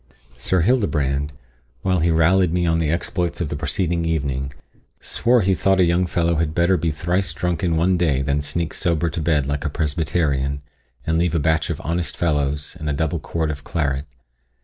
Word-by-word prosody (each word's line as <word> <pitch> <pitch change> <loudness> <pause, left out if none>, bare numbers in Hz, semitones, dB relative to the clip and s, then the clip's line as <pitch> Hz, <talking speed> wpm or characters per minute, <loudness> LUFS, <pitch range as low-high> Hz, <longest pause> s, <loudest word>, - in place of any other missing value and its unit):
Sir 90 +8 +1
Hildebrand, 75 - +1 0.5
while 95 -1 +2
he 85 +2 +2
rallied 85 +2 +3
me 90 0 +1
on 80 -1 +2
the 80 -2 0
exploits 85 +1 -1
of 85 - -2
the 75 - -3
preceding 85 +4 -1
evening, 70 -5 -1 0.5
swore 120 0 +2
he 95 0 +2
thought 95 +1 +2
a - - +6
young 85 +2 +2
fellow 85 -1 +1
had 80 -1 -1
better 85 +2 +3
be 85 -1 0
thrice 85 +4 -1
drunk 90 -1 -2
in 85 -3 +1
one 90 +3 +2
day, 70 -6 +2
than 70 +2 0
sneak 80 +3 -3
sober 85 -1 0
to 80 - -3
bed 75 -3 +2
like 70 +1 -2
a 75 - -1
Presbyterian, 70 -2 -1 0.4
and 80 +1 +1
leave 85 -1 +1
a - - +3
batch 80 0 +1
of - - -3
honest 85 +1 -2
fellows, 75 -1 0
and 75 -1 -3
a - - 0
double 80 +3 -1
quart 80 0 -2
of 70 -1 -7
claret. 70 -3 -2
80 Hz, 195 wpm, -21 LUFS, 75-85 Hz, 0.5 s, a